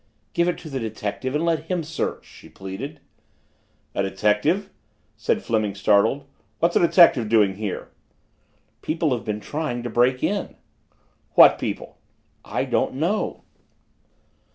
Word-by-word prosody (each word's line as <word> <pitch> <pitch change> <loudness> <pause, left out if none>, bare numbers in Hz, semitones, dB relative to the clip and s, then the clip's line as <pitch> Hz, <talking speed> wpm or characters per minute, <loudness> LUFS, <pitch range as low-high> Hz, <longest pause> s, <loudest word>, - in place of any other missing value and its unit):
"Give 170 0 +2
it 175 - -2
to 165 - -10
the 135 - -2
detective 110 +4 -4
and 155 +3 +1
let 165 -2 0
him 175 -1 -2
search," 160 +2 -4
she - - -15
pleaded. 95 +11 -7 0.9
"A - - 0
detective?" 105 - +1 0.4
said - - -1
Fleming 110 -3 0
startled. 100 +7 +2 0.3
"What's 170 +1 +1
a - - +6
detective 165 - +5
doing 105 -4 +3
here?" 105 -3 -5 0.9
"People 160 -1 -1
have 115 - -6
been 105 -1 -3
trying 145 0 -3
to 120 - -4
break 125 +2 +2
in." 205 0 -1 0.8
"What - - +8
people?" - - -5 0.4
"I - - -2
don't - - 0
know." 170 +10 -1
130 Hz, 135 wpm, -23 LUFS, 105-165 Hz, 0.9 s, What